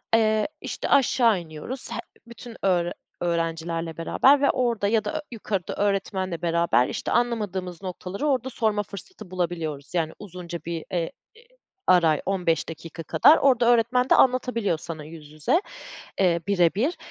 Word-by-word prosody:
eee, 215 -1 +3
işte - - -4
aşağı 235 -6 +4
iniyoruz. 170 - -7
He - - -3 0.3
bütün 235 0 -11
öğre 175 -3 +2 0.3
öğrencilerle 165 -1 -2
beraber 270 - +4
ve 280 - +4
orada 235 -5 0
ya 220 0 +1
da - - -2
ö 310 - -1
yukarıda 200 -5 -3
öğretmenle 190 -3 -1
beraber 170 -7 +2
işte - - -4
anlamadığımız 200 -7 -1
noktaları 190 +7 -4
orada 260 -2 0
sorma 215 -3 0
fırsatı 205 - -10
bulabiliyoruz. 165 -5 -3
Yani 160 -2 0
uzunca 180 -3 -7
bir, 165 -1 -4
eee, 170 -2 -1 0.2
e - - -18 0.5
ara, 165 -5 +4
15 180 -4 0
dakika 165 0 -8
kadar. 305 - +6
Orada 250 -3 +3
öğretmen 245 +2 +3
de - - +6
anlatabiliyor 245 -8 +2
sana 160 -1 -7
yüz 150 -1 -11
yüze, 155 - +1 0.6
eee, 175 -3 +3
birebir 200 - +2
185 Hz, 145 wpm, -25 LUFS, 170-230 Hz, 0.6 s, kadar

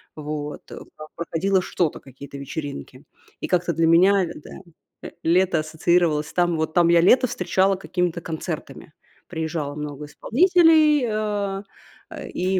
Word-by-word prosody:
вот. 150 -1 -6
Там - - -11 0.3
проходило 185 +3 0
что-то, 175 -3 -2
какие-то 140 +1 -11
вечеринки. 140 -1 -7 0.4
И - - -4
как-то 175 -1 0
для 165 0 +1
меня 185 +3 +4
да, - - -12 0.5
э, - - -7
лето 175 0 +2
ассоциировалось, 155 0 0
там, 175 -2 +1
вот 160 0 -2
там 170 0 +4
я 170 0 +5
лето 255 +8 +5
встречала 195 -3 +1
какими-то 180 -2 -2
концертами. 160 -1 -7 0.3
Приезжало 160 -3 -4
много 150 -1 -6
исполнителей, 315 - +3
э, 205 -2 -2 0.5
э, - - -8
и 185 +1 -1
170 Hz, 135 wpm, -22 LUFS, 155-195 Hz, 0.5 s, я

